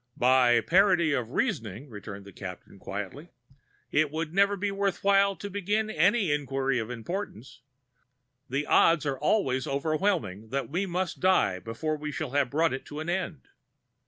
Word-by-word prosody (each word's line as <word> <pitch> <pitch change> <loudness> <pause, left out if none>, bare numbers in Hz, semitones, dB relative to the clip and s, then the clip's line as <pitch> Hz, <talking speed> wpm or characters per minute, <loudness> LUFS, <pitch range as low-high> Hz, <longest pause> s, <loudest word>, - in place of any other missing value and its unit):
"By 125 -2 +4
parity 175 - +4
of 125 -4 -1
reasoning," 115 - -2
returned 100 -3 -9
the 100 - -11
Captain 95 0 -9
gently, 105 - -6 0.6
"it 150 0 +3
would 160 +1 -4
never 200 +1 +3
be 200 +1 -1
worth 195 -1 -1
while 200 0 +4
to 205 - -7
begin 205 +2 -1
any 190 +1 +3
inquiry 135 -3 0
of 110 0 -4
importance; 125 - -6 0.9
the 140 +3 -1
odds 165 -3 +4
are 135 -2 -2
always 135 -6 +1
overwhelming 140 - -1
that 135 +3 -2
we 190 +5 -1
must 180 0 -2
die 185 - +3
before 135 - -3
we 150 0 -5
shall 150 -3 -4
have 140 -2 +1
brought 160 +3 +1
it 130 - -4
to 150 - -7
an 160 +2 -4
end. 175 -6 -3
150 Hz, 160 wpm, -28 LUFS, 125-185 Hz, 0.9 s, By